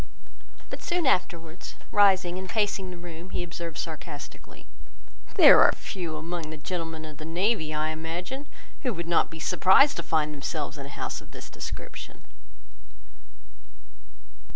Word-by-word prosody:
But - - -6
soon 350 -2 0
afterwards, 175 -7 -1 0.2
rising 190 -3 +4
and 190 -1 -7
pacing 205 -3 0
the 180 - -8
room, 175 +1 -9
he 180 - -2
observed 170 -1 -6
sarcastically— 150 -3 -8 0.7
"There - - +9
are - - +8
few 170 -5 -5
among 165 0 -4
the 155 - -6
gentlemen 165 0 -4
of 155 -2 -10
the 155 - -8
navy, 175 0 +1
I 155 0 0
imagine, 175 - -5 0.3
who 250 -7 -1
would 170 0 -4
not 170 - +3
be 160 - -9
surprised 230 - +5
to - - -1
find 150 -1 +1
themselves 150 +1 -4
in 140 - -6
a - - -11
house - - -4
of - - -15
this - - -10
description." - - -7
170 Hz, 150 wpm, -27 LUFS, 155-185 Hz, 0.7 s, There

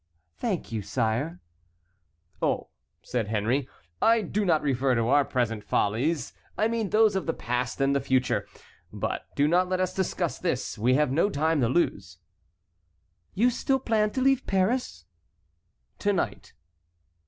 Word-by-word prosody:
"Thank 200 - -3
you, 110 -2 -2
sire." 110 -5 -2 1.0
"Oh," - - 0 0.3
said 120 -4 -2
Henry, 115 +6 0 0.3
"I 225 -1 +4
do 205 +3 -1
not 160 -4 +2
refer 135 -2 +1
to 115 0 +1
our 145 +1 +5
present 115 -5 -1
follies. 125 +11 0 0.2
I 215 - +3
mean 225 -3 -1
those 215 -2 +4
of 190 - -2
the 165 - 0
past 125 +2 -2
and 135 0 +2
the - - +3
future. 130 -1 0 0.4
But - - -4
do 145 - +3
not 180 +3 +2
let 185 0 0
us 185 -1 0
discuss 185 -3 -2
this; 150 -8 -2
we 120 +4 +2
have 150 -2 +2
no 165 +9 +2
time 160 -3 +1
to 115 - +2
lose." 100 - -1 1.2
"You 240 +5 +3
still 265 +3 +1
plan 220 -4 +1
to 260 - -1
leave 270 0 +2
Paris?" 190 - 0 0.9
"To - - +1
night." - - -3
145 Hz, 155 wpm, -27 LUFS, 120-195 Hz, 1.2 s, our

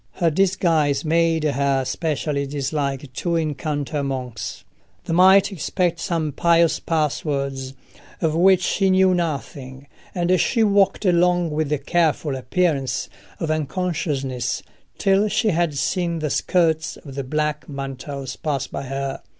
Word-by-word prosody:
Her 170 -3 +1
disguise 165 -5 +2
made 165 0 +2
her 140 -2 +1
especially 145 -1 -2
dislike 140 -1 -3
to 170 +5 -1
encounter 150 -2 -2
monks: 130 -5 -5 0.4
they - - -2
might 190 +3 +6
expect 175 -1 -1
some 165 -5 -1
pious 170 +3 +3
passwords 140 -4 -2 0.4
of 160 -2 0
which 185 +2 +4
she 195 +1 +1
knew 185 0 +4
nothing, 140 -5 -4 0.3
and 180 -1 +2
she 230 -3 +2
walked 200 0 +2
along 175 -1 +3
with 150 -1 -1
a 150 - +2
careful 155 -1 0
appearance 135 -1 -1 0.3
of 160 -2 -1
unconsciousness 150 -6 -2 0.3
till 195 +2 +3
she 215 +2 +1
had 170 -5 0
seen 170 +2 0
the 155 -3 -2
skirts 160 -2 +1
of 140 - -11
the 140 0 -4
black 150 +1 -2
mantles 135 -1 -6
pass 140 -4 -2
by - - -6
her. 135 +1 -4
155 Hz, 135 wpm, -22 LUFS, 140-175 Hz, 0.4 s, might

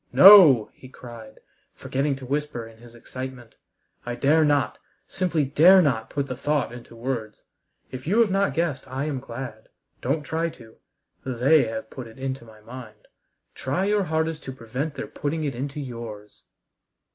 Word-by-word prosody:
"No!" 180 - +9
he 130 - -14
cried, 115 -4 -12 0.3
forgetting 140 +1 -1
to 135 -1 -10
whisper 145 -3 -3
in 115 0 -17
his 120 0 -15
excitement. 130 -1 -8 0.5
"I 120 0 -4
dare 150 +5 +3
not, 145 -3 +1 0.3
simply 175 -6 0
dare 165 +8 +6
not, 115 -10 +1
put 140 -1 -2
the 130 -2 -5
thought 145 0 -1
into 120 -1 -11
words. 115 -3 -5 0.5
If 130 +2 -8
you 205 +7 +2
have 220 -4 +2
not 195 +1 +1
guessed 160 -5 -1
I 130 +2 -3
am 145 -4 -3
glad. 120 -3 -8 0.3
Don't 145 +5 -1
try 165 +3 -2
to. 115 -7 -16 0.5
They 130 +4 +3
have 110 0 -6
put 130 -3 -8
it 110 - -15
into 130 -1 -4
my 110 -1 -16
mind; 115 -2 -12 0.4
try 140 +9 -2
your 205 -1 +1
hardest 160 -1 -2
to 135 - -5
prevent 130 +5 -5
their - - -5
putting 155 +2 -3
it 140 -2 -2
into 140 +4 -5
yours." 115 -6 -9
130 Hz, 170 wpm, -24 LUFS, 120-150 Hz, 0.5 s, No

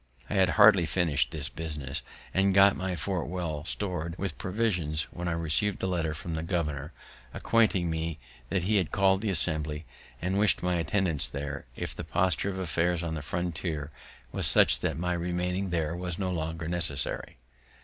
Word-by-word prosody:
I - - 0
had 95 -2 +4
hardly 100 -5 +7
finish'd 85 -4 +1
this 75 -3 -4
business, 75 -4 -5 0.3
and 95 0 +3
got 100 0 +7
my 95 0 -2
fort 95 0 -2
well 80 -4 -3
stor'd 90 -4 -3
with 95 -5 -3
provisions, 90 -7 0
when 90 0 -5
I 85 - 0
receiv'd 85 +5 0
a - - +3
letter 85 -4 -1
from 85 +2 -5
the 80 - -2
governor, 80 -4 -2 0.4
acquainting 110 -6 +2
me 80 -1 -2 0.3
that 95 -3 0
he 105 +3 +2
had 90 -5 +1
call'd 95 0 +3
the 110 - -1
Assembly, 80 -3 0 0.3
and 95 +3 0
wished 105 -3 +4
my 90 -1 +1
attendance 85 -3 0
there, 70 0 -5
if - - -4
the - - -5
posture 95 +1 +1
of 95 - -4
affairs 85 -1 0
on 85 -1 -2
the 75 - -3
frontiers 80 -1 -3 0.4
was - - 0
such - - +5
that - - -1
my 90 +1 0
remaining 90 +2 -1
there 85 -1 -1
was 90 -1 -4
no 95 -2 -1
longer 80 -1 -3
necessary. 85 -5 -1
85 Hz, 180 wpm, -29 LUFS, 80-95 Hz, 0.4 s, hardly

